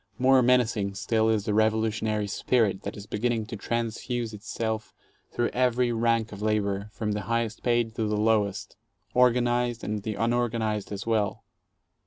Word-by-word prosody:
More 130 +1 +5
menacing 115 -5 +2
still 110 +3 +1
is 110 -2 +1
the 105 - 0
revolutionary 110 0 +1
spirit 100 -1 +1
that 100 - -6
is 100 - -8
beginning 115 +1 -1
to 115 +1 -7
transfuse 115 +1 -3
itself 110 +1 -4 0.4
through 120 - 0
every 125 -1 +1
rank 115 -1 +1
of 105 -1 -8
labor, 105 -1 0
from 105 0 -3
the 105 0 -2
highest 115 -1 -1
paid 120 -2 +1
to 110 -2 0
the 105 0 0
lowest, 105 -2 0 0.4
organized 120 -1 +2
and 105 0 -2
the 110 +1 -4
unorganized 115 -3 0
as 100 0 -5
well. 110 -3 0
110 Hz, 155 wpm, -27 LUFS, 105-120 Hz, 0.4 s, More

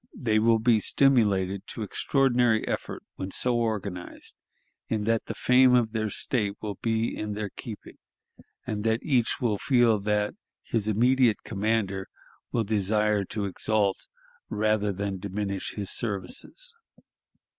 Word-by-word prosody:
They 110 -4 +2
will 115 +1 +4
be 110 0 +3
stimulated 100 -8 +2
to 110 - -5
extraordinary 120 0 +2
effort - - -4
when 95 - -4
so 125 +5 0
organized, 105 -6 -3 0.5
in 110 -2 -1
that 115 +1 0
the - - -4
fame 125 0 +5
of 115 -3 +2
their 110 -1 -1
State 105 -1 -1
will 105 -3 -6
be 115 0 0
in 105 -1 -4
their 105 -1 -4
keeping, 115 -5 -9 0.7
and 105 -1 -3
that 115 +1 +1
each 125 -5 +1
will 110 -6 0
feel 120 -5 +3
that 105 +1 0 0.3
his 110 -3 -1
immediate 120 +2 +3
commander 100 -2 -1 0.4
will 115 - +1
desire 105 0 +1
to 105 +1 -3
exalt 100 0 -1 0.4
rather 105 -1 +1
than 100 0 -3
diminish 100 0 -4
his 100 -2 -3
services. 115 - -3
110 Hz, 135 wpm, -27 LUFS, 100-115 Hz, 0.7 s, fame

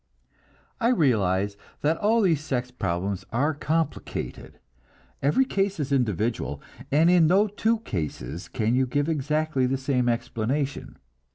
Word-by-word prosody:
I 235 - +2
realize 100 - +2 0.2
that 155 +2 +2
all 220 +2 +3
these 165 -6 +2
sex 125 -5 -2
problems 95 -3 -2
are 145 +7 +1
complicated. 155 +2 -3 0.6
Every 150 - +3
case 195 -6 -1
is 140 -2 -2
individual, 110 - 0 0.3
and 155 +4 +4
in 175 -3 +5
no 195 +5 +4
two 220 +2 0
cases 80 - -4
can 115 -1 0
you 130 +1 +2
give 145 +3 0
exactly 150 -3 0
the 135 +1 0
same 130 -2 0
explanation. 125 +4 -2
140 Hz, 130 wpm, -26 LUFS, 115-160 Hz, 0.6 s, in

